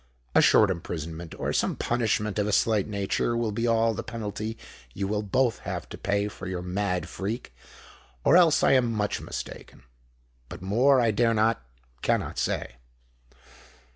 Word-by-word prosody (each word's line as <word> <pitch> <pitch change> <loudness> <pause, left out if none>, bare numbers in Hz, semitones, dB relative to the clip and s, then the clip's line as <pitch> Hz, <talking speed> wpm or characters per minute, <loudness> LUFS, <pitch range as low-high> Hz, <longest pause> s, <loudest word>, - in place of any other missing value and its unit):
A - - +6
short 105 -3 +5
imprisonment—or 85 -1 -5
some - - +1
punishment 110 -3 0
of 105 - +1
a - - 0
slight 105 0 +2
nature, 100 +3 -1
will 115 -2 0
be 115 +3 -1
all 115 0 +3
the 115 - -4
penalty 110 -1 -5 0.4
you 100 0 -2
will 105 +1 -1
both 115 +4 +1
have - - -5
to - - -7
pay 100 +1 0
for 100 -2 -8
your 90 -1 -4
mad 90 -2 -2
freak—or 65 - -4
else 170 -3 +5
I - - +5
am 125 -3 +3
much 105 -2 -1
mistaken. - - -8 0.7
But 90 0 -9
more 125 +8 +4
I 115 -2 +3
dare 115 +2 +2
not—cannot 60 - -1
say." - - -2
105 Hz, 150 wpm, -27 LUFS, 90-115 Hz, 0.7 s, A